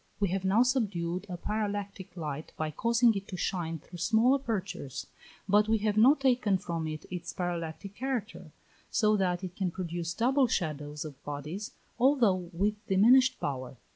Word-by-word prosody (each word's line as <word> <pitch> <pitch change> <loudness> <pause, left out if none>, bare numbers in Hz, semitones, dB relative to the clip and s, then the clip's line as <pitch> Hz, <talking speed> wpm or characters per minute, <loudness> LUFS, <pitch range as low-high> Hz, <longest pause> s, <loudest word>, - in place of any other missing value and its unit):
We 200 -2 +1
have 190 +1 -1
now 200 +5 +4
subdued 200 -8 -1
a 180 - -4
parallactic 205 -2 -4
light 150 -2 -5
by 155 -1 -2
causing 235 - +3
it 195 -1 -5
to 185 - -6
shine 165 -3 -2
through 175 +3 -12
small 225 +9 +4
apertures, 200 - -3 0.4
but 210 +2 +4
we 225 - +4
have 210 -1 +2
not 265 +7 +6
taken 245 -7 +3
from 165 -3 -3
it 155 -1 -6
its 180 -2 -5
parallactic 175 +1 -4
character; 230 - -4 0.4
so 215 -2 +3
that 180 -1 0
it 180 -1 -6
can 190 -2 -1
produce 170 -1 -4
double 260 +3 +3
shadows 150 -7 -2
of 145 -2 -10
bodies, 150 +8 -5 0.3
although 230 -10 +3
with 205 +4 -1
diminished 250 +7 +5
power. 130 -2 -4
190 Hz, 165 wpm, -30 LUFS, 170-220 Hz, 0.4 s, not